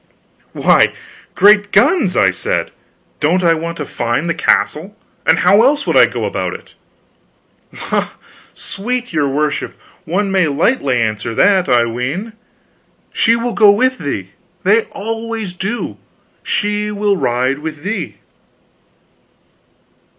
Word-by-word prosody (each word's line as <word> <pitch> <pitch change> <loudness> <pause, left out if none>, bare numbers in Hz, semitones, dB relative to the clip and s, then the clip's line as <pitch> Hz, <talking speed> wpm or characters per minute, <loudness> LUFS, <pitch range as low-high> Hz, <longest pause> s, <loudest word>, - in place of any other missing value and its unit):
"Why, - - +3 0.4
great 205 0 +5
guns," 290 - +3
I 95 -1 +4
said, 95 - -2 0.5
"don't 175 +5 +1
I 165 -1 +4
want 165 +1 -4
to 150 - -4
find 120 +6 -2
the 170 - 0
castle? 180 +4 0 0.3
And - - +5
how 195 +4 +4
else 280 +3 +2
would - - 0
I - - +7
go - - -4
about - - -3
it?" - - -13 1.0
"La, - - -3 0.5
sweet 245 +2 -5
your 150 -3 +1
worship, 150 +2 -2 0.3
one 195 +4 -1
may 190 -4 +2
lightly 140 - +1
answer 110 0 -2
that, 190 - +3
I 120 -1 +4
ween. 135 - -4 0.8
She 230 - +3
will 235 0 -2
go 210 -2 +5
with 255 +5 +1
thee. 100 -10 -4 0.3
They 210 +4 +3
always 225 -2 -5
do. 195 +6 -4 0.4
She 210 -1 -1
will 205 -1 0
ride 130 -3 0
with 155 -1 -7
thee." 205 +3 -4
185 Hz, 130 wpm, -16 LUFS, 145-215 Hz, 1.0 s, I